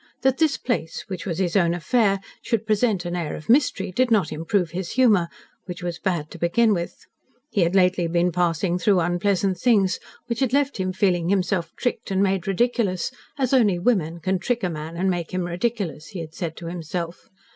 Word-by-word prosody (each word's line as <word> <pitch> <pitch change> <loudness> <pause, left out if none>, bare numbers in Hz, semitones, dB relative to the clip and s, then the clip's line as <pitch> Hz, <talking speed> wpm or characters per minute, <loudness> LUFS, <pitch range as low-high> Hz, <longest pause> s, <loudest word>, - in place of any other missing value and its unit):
That 265 0 +2
this 315 -4 +3
place 170 -10 -2
which 185 0 -5
was 170 -3 -2
his 180 -1 0
own 170 -3 +3
affair 195 +3 +2 0.2
should 225 -2 -1
present 215 -4 +1
an 175 0 -2
air 170 -4 -3
of 155 - -10
mystery, 230 -7 +3
did 255 +7 +2
not 210 -8 +2
improve 165 +2 0
his 175 +1 -4
humour, 220 -9 +4 0.4
which 180 -1 -6
was 175 -1 -3
bad 170 -6 -2
to 175 - -10
begin 215 +7 +3
with. 170 -2 -4 0.5
He 200 - +1
had 170 +2 +2
lately 180 -2 +3
been 175 +1 +1
passing 175 +1 0
through 195 0 +3
unpleasant 185 +2 +1
things, 200 -6 +3 0.3
which 235 -1 -3
had 260 -2 +1
left 280 -1 +2
him 185 0 0
feeling 180 -3 +1
himself 185 -2 0
tricked 245 -3 -2
and 195 0 +2
made 190 -2 0
ridiculous 195 -3 0 0.3
as 265 -2 0
only 215 -8 +4
women 175 -5 +1
can 185 +3 0
trick 240 +4 -1
a 180 - 0
man 160 +1 -6
and 190 +2 0
make 175 -3 -1
him 185 - 0
ridiculous, 175 -3 -2
he 195 -5 -7
had 160 -1 -7
said 170 -4 -5
to 170 - -8
himself. 170 0 -5
185 Hz, 200 wpm, -23 LUFS, 170-215 Hz, 0.5 s, humour